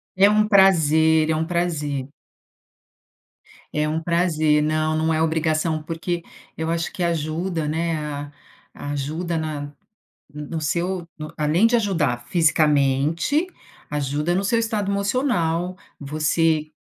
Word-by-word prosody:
É 195 +2 +6
um 210 0 +3
prazer, 160 -5 +4
é 160 - +2
um 160 +1 -1
prazer. 155 -6 -2 1.6
É 150 0 0
um 155 +1 -1
prazer 160 -3 +2
não, 155 +1 0
não 160 +1 +1
é 155 - +1
obrigação 160 0 0
porque 165 +2 -4 0.3
eu 160 0 -2
acho 165 0 -1
que - - -7
ajuda, 165 0 -1
né, 165 +2 -1
a 145 -1 -5 0.6
ajuda 155 +5 -3
na 155 -2 -3
no 145 0 -7 0.6
no 150 +2 -6
seu, 170 +3 -2
no 155 +1 -7
além 155 +8 +3
de 235 - +1
ajudar 150 - 0
fisicamente, 155 - +2 0.4
ajuda 150 +3 -1
no 190 +2 0
seu 230 +4 +2
estado 215 -3 -1
emocional, 200 - 0 0.2
você 155 +2 0
160 Hz, 130 wpm, -22 LUFS, 150-175 Hz, 1.6 s, É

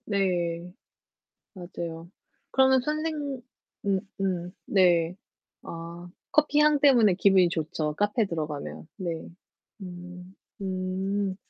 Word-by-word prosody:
네. 180 -4 0 0.8
맞아요. 170 -2 -7 0.4
그러면 265 0 +5
선생 310 +4 -1 0.7
음 195 -1 +2 0.2
음 180 -2 -1
네. 175 -3 +3 0.5
아 170 +1 -8 0.2
커피 300 -1 +3
향 300 -1 +5
때문에 240 -9 +6
기분이 190 -1 +5
좋죠 155 -2 -2
카페 205 - +1
들어가면. 155 -4 -4
네. 170 -5 -4 0.5
음 180 0 -9 0.3
음. 190 +1 -2
185 Hz, 170 characters per minute, -27 LUFS, 170-205 Hz, 0.8 s, 때문에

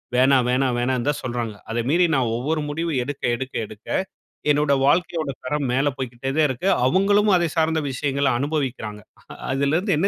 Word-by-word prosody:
வேணாம் 130 0 +4
வேணாம், 125 0 +1
வேணான்தான் 130 +3 0
சொல்றாங்க. 120 -3 -3 0.2
அதை 115 +1 -1
மீறி 175 +4 +4
நான் 125 -4 +1
ஒவ்வொரு 150 +6 -1
முடிவு 165 +3 -2
எடுக்க, 140 +2 -6
எடுக்க, 130 +1 -6
எடுக்க 110 +1 -14 0.6
என்னோட 145 -1 +2
வாழ்க்கையோட 160 +1 +1 0.2
தரம் 145 +2 -1
மேலே 135 +3 +2
போய்க்கிட்டேதேன் 135 +3 -1
இருக்கு. 130 +7 -3 0.2
அவுங்களும் 200 +7 +3
அதை 175 -1 +2
சார்ந்த 160 0 +2
விஷயங்கள 140 +1 0
அனுபவிக்கிறாங்க. 130 -7 -2 0.5
அதிலருந்து 145 +9 +1
என்ன 180 +6 +2
140 Hz, 150 wpm, -23 LUFS, 125-160 Hz, 0.6 s, வேணாம்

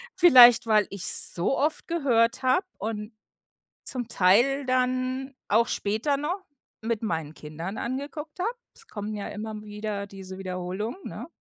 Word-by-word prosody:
Vielleicht, 250 -11 +8
weil 215 -2 +4
ich's 200 -2 -1
so 180 +10 +1
oft 300 +2 -1
gehört 250 -9 +2
hab 255 +9 +3
und 215 +1 -5 0.7
zum 245 -3 -5
Teil 240 +10 +3
dann 255 +1 -1
auch 230 +3 +4
später 220 +9 0
noch 350 +7 -3 0.4
mit 225 0 -2
meinen 160 -7 -2
Kindern 165 +7 -7
angeguckt 290 +6 -5
habe. 390 - +1 0.2
Es 455 - -18
kommen 210 - -5
ja 205 - -5
immer 220 +1 -6
m 210 -1 -7
wieder 210 -1 -5
diese 190 -1 -10
Wiederholungen, 185 - -4
ne? - - -7
225 Hz, 145 wpm, -26 LUFS, 200-265 Hz, 0.7 s, Vielleicht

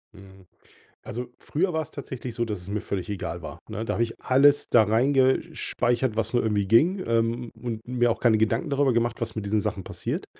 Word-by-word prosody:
Hm. 95 0 -15 0.6
Also, 125 +3 -4
früher 175 +3 -1
war's 160 -1 -2
tatsächlich 130 -4 -7
so, 120 0 -1
dass 105 -5 -4
es 95 - -8
mir 105 +1 -1
völlig 100 -3 -4
egal 90 -3 -4
war, 80 - -8
ne? 110 0 -4
Da - - -2
habe 115 - +1
ich 115 -1 -3
alles 140 +2 +4
da 115 -2 +6
reingesch 130 +7 +2 0.2
speichert, 120 -1 0
was 115 - -1
nur 120 - +2
irgendwie 105 -2 0
ging, 165 - +3
ähm, 115 +1 0
und 115 -2 -5
mir 120 -1 +2
auch - - -2
keine 115 -3 +4
Gedanken 115 +7 0
darüber 140 -2 +2
gemacht, 120 0 0
was 115 -1 -3
mit 110 - -3
diesen 105 +1 +1
Sachen 105 -2 -3
passiert. - - -4
115 Hz, 215 wpm, -26 LUFS, 105-130 Hz, 0.6 s, da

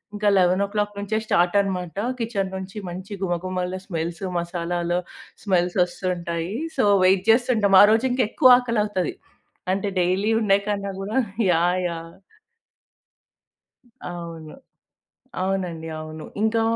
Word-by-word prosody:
ఇంకా 210 0 -1
11:00 200 +3 +1
నుంచే 205 +2 -2
స్టార్ట్ 175 -2 +2
అనమాట. 180 -3 -4 0.2
కిచెన్ 200 -5 -2
నుంచి 190 +2 -7
మంచి 185 +3 -7
గుమగుమలు, 180 +1 -2
స్మెల్స్ 170 0 -4 0.2
మసాలాలు 175 0 -2 0.5
స్మెల్స్ 180 -2 +1
వస్తుంటాయీ. 175 0 -3 0.2
సో, 255 - +3 0.2
వెయిట్ 190 0 +4
చేస్తుంటాం. 225 -4 +3
ఆ - - +10
రోజు 225 +4 +3
ఇంక 250 +1 +1
ఎక్కువ 255 -2 +7
ఆకలవుతది. 210 -6 -1 0.6
అంటే 200 +1 -2
డైలీ 185 +5 +1
ఉండే 200 -2 +3
కన్నా 200 -1 -2
గూడా 210 +6 -3 0.3
యాహ్! 175 +2 +2
యాహ్! 165 0 -8 1.9
అవును. 165 -3 -8 0.9
అవునండి. 180 -4 -2
అవును. 155 0 -8 0.2
ఇంకా, 220 +1 +2
185 Hz, 115 wpm, -23 LUFS, 175-205 Hz, 1.9 s, ఆ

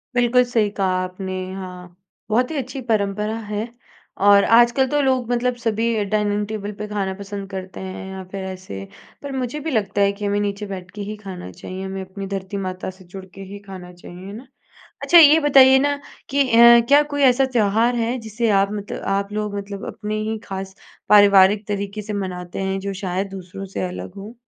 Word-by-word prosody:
बिल्कुल 245 +1 +4
सही 230 -4 +1
कहा 195 - +1 0.2
आपने, 185 +1 -6 0.2
हाँ। 180 -2 -9 0.3
बहुत 250 +6 +1
ही - - -4
अच्छी 260 +1 -4
परंपरा 210 -1 -1
है 210 +2 -2 0.6
और 200 0 +7
आजकल 240 +3 +4
तो 295 0 +1
लोग 260 -3 +1
मतलब 245 +1 0
सभी 225 -1 0
डाइनिंग 210 0 0
टेबल 210 -1 -5
पे 210 - -4
खाना 200 -2 -2
पसंद 200 -1 -7
करते 190 -1 -7
हैं 190 0 -7
या 190 0 -7
फिर 195 -1 -5
ऐसे 185 - -7 0.4
पर 280 - -5
मुझे 255 +4 -3
भी - - -1
लगता 205 -3 0
है 200 0 +4
कि 205 +1 -6
हमें 205 0 0
नीचे 205 0 -3
बैठ 185 -2 -7
के 205 - -6
ही 210 +1 -5
खाना 185 - -8
चाहिए 185 - -8
हमें 190 0 -5
अपनी 195 +1 -7
धरती 195 0 -4
माता 185 0 -4
से 190 - -16
जुड़ 190 +2 -10
के 195 - -9
ही 200 - -8
खाना 180 -2 -9
चाहिए 180 +2 -11
ना। 245 +5 -10 0.6
अच्छा 345 - +6
ये 310 0 +8
बताइए 265 -2 +7
ना 285 +1 +1 0.3
कि 280 +1 +3
अ, 235 +1 +8
क्या 290 +1 +7
कोई 285 0 -1
ऐसा 265 0 +5
त्योहार 225 +2 +2
है 235 +2 0
जिसे 225 0 -2
आप 200 - +2
मतलब 205 -1 -6
आप 200 +1 -3
लोग 210 -1 -3
मतलब 200 0 -6
अपने 215 0 -4
ही 220 0 -2
खास 190 -1 -6 0.3
पारिवारिक 205 0 +6
तरीके 200 +1 -3
से 210 +1 -6
मनाते 180 -1 -6
हैं 190 0 -1
जो 200 0 -4
शायद 190 +1 -2
दूसरों 190 0 -8
से - - -1
अलग 180 +1 -8
हो? 205 +4 -9
205 Hz, 200 wpm, -21 LUFS, 190-235 Hz, 0.6 s, ये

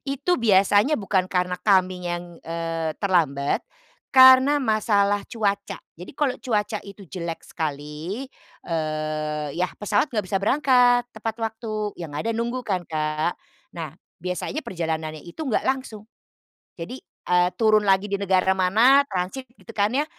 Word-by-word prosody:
Itu 320 +5 0
biasanya 205 +5 +4
bukan 195 -4 0
karena 180 -1 -1
kaminya 185 -2 +1
yang, 175 0 -7
eee, 165 -1 -3
terlambat 155 -8 +1 0.5
karena 260 +2 +8
masalah 205 -3 +1
cuaca. 200 -3 -2 0.2
Jadi, 180 - -9
kalau 280 -4 0
cuaca 210 -4 -1
itu 200 0 -11
jelek 170 -2 -6
sekali, 155 - -5 0.3
eee, 155 -2 -2
iya 180 - +2
pesawat 210 +6 +1
enggak 210 -2 0
bisa 195 - +3
berangkat 245 +1 +4
tepat 220 0 -4
waktu, 220 -2 -3
yang 160 -4 -7
ada 225 +9 -1
nunggu 235 +2 -2
kan 185 -6 -2
Kak? 155 +1 -1 0.4
Nah, 160 -4 -5 0.3
biasanya 180 - -3
perjalanannya 160 -3 -3
itu 170 - -9
enggak 265 -7 -1
langsung, 260 -6 -3 0.7
jadi, 170 +8 -6 0.3
eee, 180 0 +3
turun 215 -2 +5
lagi 195 0 +3
di 200 - -1
negara 190 -1 +3
mana 220 +9 +5
transit, 195 +8 -4
gitu 230 - -12
kan 205 0 +2
ya, 280 +4 +1
200 Hz, 140 wpm, -24 LUFS, 170-225 Hz, 0.7 s, karena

